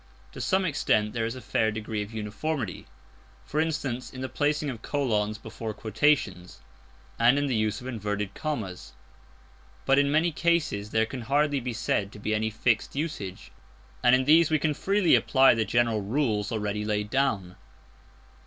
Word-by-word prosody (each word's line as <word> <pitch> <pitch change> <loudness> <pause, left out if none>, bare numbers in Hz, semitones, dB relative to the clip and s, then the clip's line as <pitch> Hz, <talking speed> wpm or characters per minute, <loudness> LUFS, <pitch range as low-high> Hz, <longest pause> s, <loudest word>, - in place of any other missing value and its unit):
To - - -8
some 190 -1 +1
extent 105 -9 +1
there 115 -1 -1
is 115 - -5
a 130 - -8
fair 110 -1 +1
degree 110 0 -3
of 105 +1 -6
uniformity; 110 - -4 0.6
for 150 - -2
instance, 145 -6 -2
in 130 - -8
the 130 - -3
placing 150 0 0
of 115 -3 -9
colons 110 -8 -1
before 110 -1 -7
quotations, 105 -6 0 0.6
and 120 +4 +5
in 145 - +1
the 135 - -1
use 110 +2 0
of - - -11
inverted 105 -5 -3
commas. 110 - -5 0.9
But 135 +1 +4
in 140 0 +2
many 160 +3 +3
cases 155 -11 0
there 110 0 +2
can 125 +2 -7
hardly 145 +4 +1
be 125 -1 -4
said 105 -3 -1
to - - -10
be 110 +1 -2
any 110 +1 0
fixed 110 +2 0
usage, 140 - -5 0.5
and 125 - +6
in 130 0 +1
these 160 +2 +6
we 155 - +3
can 155 +1 0
freely 195 +3 +2
apply 135 -1 +5
the 115 -2 0
general 115 -2 +1
rules 105 -2 -1
already 105 -1 -2
laid 105 0 -2
down. 100 -10 0
115 Hz, 170 wpm, -27 LUFS, 105-145 Hz, 0.9 s, and